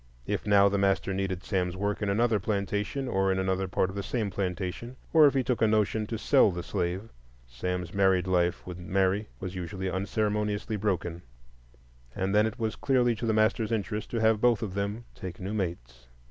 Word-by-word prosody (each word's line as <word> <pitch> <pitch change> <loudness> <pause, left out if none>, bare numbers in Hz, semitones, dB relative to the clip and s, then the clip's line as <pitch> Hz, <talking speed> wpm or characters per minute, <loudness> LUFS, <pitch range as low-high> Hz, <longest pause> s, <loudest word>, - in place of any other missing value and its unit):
If - - -3
now 100 -1 +6
the 100 0 +1
master 100 0 +1
needed 95 -1 -2
Sam's 90 -2 -1
work 100 +1 -1
in 105 - 0
another 110 +1 +2
plantation 105 +6 -2
or 95 -4 +1
in 95 - 0
another 95 0 0
part 95 0 0
of - - -10
the 100 - -2
same 105 0 -2
plantation, 95 +6 -3 0.2
or 155 -2 +8
if 140 - +1
he 135 - +2
took 125 0 -1
a 110 - +5
notion 110 0 +1
to 115 - -3
sell 110 - +4
the 90 -2 -4
slave, 95 +3 -2 0.4
Sam's 90 +9 -4
married 95 -2 +3
life 90 -1 +1
with 90 -1 -7
Mary 95 +3 0
was 95 -1 -5
usually 95 +1 -4
unceremoniously 105 +2 -1
broken, 90 -4 -2 0.9
and 95 +1 -1
then 105 +1 +4
it 110 +2 -6
was 110 -3 -2
clearly 125 -3 +2
to 115 +1 -4
the 110 - +2
master's 110 0 +2
interest 105 -1 -2
to 120 - -3
have 110 -1 +3
both 120 -3 +3
of 100 -4 -4
them 100 +4 -3
take 90 -2 -8
new 95 +3 -4
mates. 65 - -4
100 Hz, 200 wpm, -28 LUFS, 95-110 Hz, 0.9 s, or